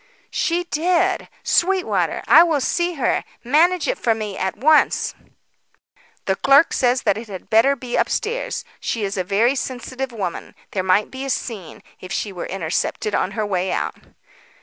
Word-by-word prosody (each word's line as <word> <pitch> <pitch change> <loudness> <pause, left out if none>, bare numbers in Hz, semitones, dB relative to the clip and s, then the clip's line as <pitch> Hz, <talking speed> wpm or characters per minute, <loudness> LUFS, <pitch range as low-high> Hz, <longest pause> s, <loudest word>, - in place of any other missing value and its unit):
"She 345 +1 0
did! 345 +1 0
Sweetwater, 220 - +1
I 295 +8 +8
will 330 -4 +3
see 345 +5 0
her. 270 - 0 0.2
Manage 330 +8 +3
it - - -1
for 225 -2 +2
me 210 -3 -5
at 190 0 -3
once." 305 +3 +3 1.1
"The 190 - +1
clerk 275 +9 +4
says 250 0 +1
that 205 - +1
it 230 - -9
had 190 -3 -9
better 230 +6 +5
be 245 -2 -5
upstairs. 470 +2 -1
She 225 - -3
is 200 +1 -2
a 185 - -1
very 210 +7 +2
sensitive 260 0 -4
woman. 195 -7 -5 0.2
There 190 - -1
might 190 +3 +2
be 265 +1 -6
a 275 - -4
scene, 210 -10 -5 0.2
if 185 - -10
she 205 - -2
were 180 -2 -6
intercepted 190 +3 -2
on 195 - 0
her 215 - 0
way 190 -2 -1
out." - - -1
240 Hz, 170 wpm, -21 LUFS, 195-305 Hz, 1.1 s, I